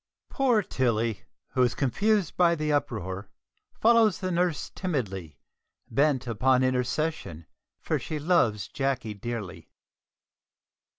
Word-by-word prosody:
Poor 250 Hz, -6 st, +2 dB
Tilly, 115 Hz, -, -1 dB, 0.2 s
who 130 Hz, -, 0 dB
is 125 Hz, -1 st, +2 dB
confused 195 Hz, -, +1 dB
by 170 Hz, -1 st, +4 dB
the 150 Hz, -1 st, -1 dB
uproar, 100 Hz, -8 st, -2 dB, 0.5 s
follows 225 Hz, -3 st, +5 dB
the 185 Hz, -1 st, -3 dB
nurse 175 Hz, -2 st, 0 dB
timidly, 100 Hz, -, -3 dB, 0.5 s
bent 140 Hz, -2 st, +2 dB
upon 125 Hz, +3 st, +2 dB
intercession, 130 Hz, -, -1 dB, 0.3 s
for -, -, -1 dB
she 155 Hz, -, -4 dB
loves 120 Hz, -, +2 dB
Jacky 135 Hz, -6 st, -2 dB
dearly. 105 Hz, -3 st, -6 dB
130 Hz, 110 wpm, -27 LUFS, 110-170 Hz, 0.5 s, follows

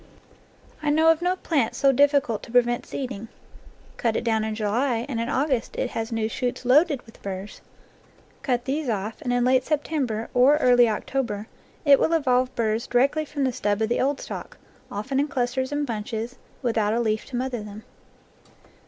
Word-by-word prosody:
I 300 Hz, -, 0 dB
know 320 Hz, +2 st, +5 dB
of 325 Hz, +1 st, 0 dB
no 360 Hz, +1 st, +1 dB
plant 290 Hz, -10 st, 0 dB
so 275 Hz, -, +4 dB
difficult 280 Hz, -5 st, +3 dB
to -, -, -11 dB
prevent 240 Hz, 0 st, +2 dB
seeding. 245 Hz, -5 st, -5 dB, 0.7 s
Cut 230 Hz, -2 st, 0 dB
it -, -, -1 dB
down 220 Hz, -2 st, +1 dB
in 220 Hz, 0 st, -2 dB
July, 230 Hz, +3 st, 0 dB
and 240 Hz, -5 st, -2 dB
in 230 Hz, -, -2 dB
August 265 Hz, -3 st, 0 dB
it -, -, -2 dB
has 225 Hz, +1 st, -3 dB
new 225 Hz, -1 st, 0 dB
shoots 245 Hz, +2 st, -3 dB
loaded 285 Hz, +2 st, +4 dB
with 225 Hz, -, -17 dB
burrs; 195 Hz, +1 st, -6 dB, 0.8 s
cut 245 Hz, -2 st, -1 dB
these 280 Hz, 0 st, -2 dB
off, 215 Hz, +3 st, -3 dB
and 250 Hz, -5 st, -2 dB
in 245 Hz, 0 st, +2 dB
late 255 Hz, 0 st, +4 dB
Sep 300 Hz, +1 st, 0 dB
tember, 245 Hz, -8 st, -2 dB
or 260 Hz, +4 st, +5 dB
early 245 Hz, -4 st, +5 dB
October, 215 Hz, -1 st, -2 dB, 0.4 s
it 280 Hz, -2 st, +7 dB
will 330 Hz, -, +2 dB
evolve 255 Hz, -5 st, +2 dB
burrs 225 Hz, 0 st, 0 dB
di 245 Hz, -, +1 dB
rectly 280 Hz, +4 st, +2 dB
from 285 Hz, -1 st, -3 dB
the 260 Hz, -2 st, +1 dB
stub 205 Hz, -2 st, 0 dB
of 220 Hz, 0 st, 0 dB
the 240 Hz, -, +1 dB
old 275 Hz, +1 st, 0 dB
stalk, -, -, -7 dB, 0.3 s
often 215 Hz, +7 st, -2 dB
in 290 Hz, -, +1 dB
clusters 260 Hz, 0 st, -1 dB
and 290 Hz, 0 st, -1 dB
bunches, 225 Hz, +1 st, -4 dB, 0.3 s
without 225 Hz, -3 st, +1 dB
a -, -, +1 dB
leaf 220 Hz, -2 st, 0 dB
to 270 Hz, -, -7 dB
mother 250 Hz, -2 st, -2 dB
them. 210 Hz, +1 st, -9 dB
245 Hz, 190 wpm, -25 LUFS, 225-275 Hz, 0.8 s, it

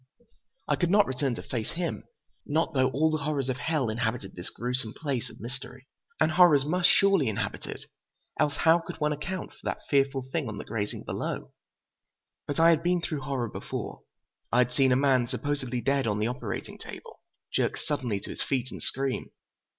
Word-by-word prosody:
I -, -, +2 dB
could 175 Hz, -, +1 dB
not 205 Hz, +2 st, +6 dB
return 130 Hz, -1 st, -1 dB
to -, -, -7 dB
face 115 Hz, -4 st, -3 dB
him, 170 Hz, 0 st, -3 dB, 0.4 s
not 160 Hz, +2 st, 0 dB
though 130 Hz, -1 st, +3 dB
all 155 Hz, +5 st, +2 dB
the 155 Hz, -, 0 dB
horrors 140 Hz, -3 st, 0 dB
of 130 Hz, -, 0 dB
hell 150 Hz, -1 st, 0 dB
inhabited 110 Hz, -2 st, -2 dB
this 90 Hz, -, -6 dB
gruesome 125 Hz, -2 st, -2 dB
place 140 Hz, -6 st, -2 dB
of -, -, -14 dB
mystery. 130 Hz, +1 st, -7 dB, 0.3 s
And 155 Hz, 0 st, +4 dB
horrors 155 Hz, -5 st, +6 dB
must 180 Hz, +3 st, +3 dB
surely 195 Hz, -, +4 dB
inhabit 110 Hz, -, -2 dB
it, -, -, -6 dB, 0.6 s
else 145 Hz, -1 st, +3 dB
how 165 Hz, +1 st, +5 dB
could 165 Hz, -, -8 dB
one 150 Hz, 0 st, +2 dB
account 175 Hz, +6 st, -4 dB
for -, -, -20 dB
that -, -, -4 dB
fearful 135 Hz, -1 st, +3 dB
thing 155 Hz, -4 st, -1 dB
on 105 Hz, -, -5 dB
the -, -, -6 dB
grating 105 Hz, -2 st, -3 dB
below? -, -, -4 dB, 1.0 s
But 145 Hz, -, -2 dB
I 165 Hz, +1 st, +8 dB
had 160 Hz, -1 st, +3 dB
been 175 Hz, 0 st, +1 dB
through 150 Hz, -4 st, -2 dB
horror 130 Hz, -3 st, -1 dB
before. -, -, -5 dB, 0.5 s
I -, -, +3 dB
had 125 Hz, 0 st, +4 dB
seen 130 Hz, 0 st, +4 dB
a -, -, +5 dB
man, 130 Hz, -2 st, +3 dB
supposedly 130 Hz, -3 st, -2 dB
dead 135 Hz, +1 st, +1 dB
on 105 Hz, -1 st, +1 dB
the 105 Hz, -, +1 dB
operating 125 Hz, +2 st, -4 dB
table, -, -, -10 dB, 0.3 s
jerk -, -, +1 dB
suddenly 125 Hz, -9 st, -2 dB
to -, -, -7 dB
his -, -, -6 dB
feet 130 Hz, -3 st, -1 dB
and -, -, -7 dB
scream. 135 Hz, 0 st, -1 dB
135 Hz, 195 wpm, -28 LUFS, 125-155 Hz, 1.0 s, I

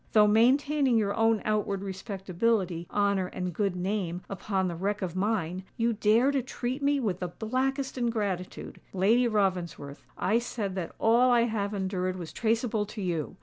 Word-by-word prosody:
Though 215 Hz, -1 st, +7 dB
maintaining 260 Hz, +4 st, +3 dB
your 200 Hz, -2 st, +1 dB
own 225 Hz, -1 st, +2 dB
outward 205 Hz, -2 st, 0 dB
respectability, 190 Hz, -2 st, -1 dB
honour, 200 Hz, -2 st, +1 dB
and 180 Hz, -1 st, -4 dB
good 195 Hz, 0 st, 0 dB
name 180 Hz, -1 st, -2 dB
upon 190 Hz, -1 st, -1 dB
the 175 Hz, -, -3 dB
wreck 200 Hz, +4 st, -2 dB
of 180 Hz, -2 st, -3 dB
mine, 185 Hz, -3 st, -1 dB
you 230 Hz, 0 st, +2 dB
dare 225 Hz, +5 st, +3 dB
to 275 Hz, -2 st, +1 dB
treat 255 Hz, +2 st, -4 dB
me 285 Hz, 0 st, +2 dB
with 200 Hz, -8 st, -1 dB
the 180 Hz, -, -2 dB
blackest 260 Hz, +7 st, -2 dB
ingratitude! 205 Hz, -7 st, -3 dB
Lady 220 Hz, +6 st, +3 dB
Ravensworth, 180 Hz, -9 st, -1 dB
I 220 Hz, +4 st, +2 dB
said 220 Hz, -5 st, -4 dB
that 185 Hz, -3 st, -5 dB
all 235 Hz, +3 st, +4 dB
I 240 Hz, -1 st, +5 dB
have 215 Hz, -3 st, -1 dB
endured 185 Hz, -1 st, -1 dB
was 175 Hz, -3 st, -7 dB
traceable 225 Hz, -2 st, 0 dB
to 215 Hz, -, -8 dB
you! 175 Hz, -4 st, -2 dB
205 Hz, 165 wpm, -28 LUFS, 185-230 Hz, -, Though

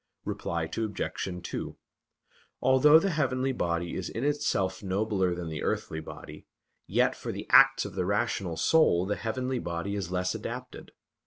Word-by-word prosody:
Reply 85 Hz, -1 st, -2 dB
Obj. 95 Hz, -1 st, -3 dB
2: -, -, -5 dB, 0.8 s
Although 130 Hz, +4 st, +6 dB
the 195 Hz, +4 st, +1 dB
heavenly 135 Hz, -4 st, 0 dB
body 85 Hz, -7 st, -2 dB
is 90 Hz, -, -4 dB
in 115 Hz, -, -4 dB
itself 145 Hz, -10 st, 0 dB
nobler 95 Hz, -2 st, 0 dB
than 85 Hz, -1 st, -5 dB
the 80 Hz, -2 st, -5 dB
earthly 80 Hz, -, -2 dB
body, 80 Hz, -, -10 dB, 0.4 s
yet -, -, +2 dB
for -, -, -5 dB
the -, -, -6 dB
acts -, -, +7 dB
of -, -, -7 dB
the 90 Hz, -2 st, -2 dB
rational 100 Hz, -5 st, -1 dB
soul 90 Hz, -, +4 dB
the 105 Hz, +1 st, -1 dB
heavenly 125 Hz, +3 st, -2 dB
body 85 Hz, +2 st, -3 dB
is 95 Hz, -4 st, -3 dB
less 90 Hz, 0 st, 0 dB
adapted. -, -, -7 dB
100 Hz, 155 wpm, -28 LUFS, 90-130 Hz, 0.8 s, acts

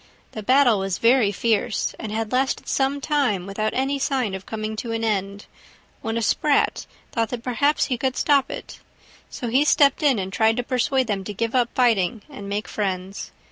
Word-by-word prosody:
The 215 Hz, -, -6 dB
battle 245 Hz, -1 st, +4 dB
was 195 Hz, -1 st, -2 dB
very 230 Hz, -3 st, +4 dB
fierce, 215 Hz, 0 st, 0 dB
and 220 Hz, -, -5 dB
had 220 Hz, 0 st, -3 dB
lasted 260 Hz, +1 st, 0 dB
some 275 Hz, +1 st, 0 dB
time 270 Hz, -, 0 dB
without 215 Hz, +2 st, -2 dB
any 270 Hz, +2 st, 0 dB
sign 260 Hz, -7 st, 0 dB
of 190 Hz, 0 st, -7 dB
coming 215 Hz, 0 st, -4 dB
to 230 Hz, +1 st, -4 dB
an 225 Hz, 0 st, -2 dB
end, 200 Hz, -2 st, -2 dB, 0.6 s
when 225 Hz, 0 st, -2 dB
a 230 Hz, -, -1 dB
Sprat 290 Hz, +6 st, +1 dB, 0.2 s
thought 225 Hz, -2 st, -1 dB
that 240 Hz, -2 st, -5 dB
perhaps 270 Hz, +5 st, +1 dB
he 250 Hz, -4 st, -2 dB
could 260 Hz, 0 st, -1 dB
stop 280 Hz, -3 st, +3 dB
it; -, -, -8 dB, 0.5 s
so 245 Hz, -, -5 dB
he 255 Hz, +5 st, +3 dB
stepped 285 Hz, -1 st, +4 dB
in 280 Hz, -5 st, +3 dB
and 190 Hz, -1 st, -4 dB
tried 220 Hz, +4 st, +2 dB
to 245 Hz, -, 0 dB
persuade 255 Hz, +1 st, +1 dB
them 200 Hz, -4 st, -2 dB
to 210 Hz, -, -6 dB
give 230 Hz, +3 st, -2 dB
up 245 Hz, -2 st, +2 dB
fighting 220 Hz, -4 st, +2 dB
and 200 Hz, -8 st, -8 dB
make 205 Hz, +2 st, -3 dB
friends. 190 Hz, -1 st, -4 dB
230 Hz, 195 wpm, -23 LUFS, 205-265 Hz, 0.6 s, battle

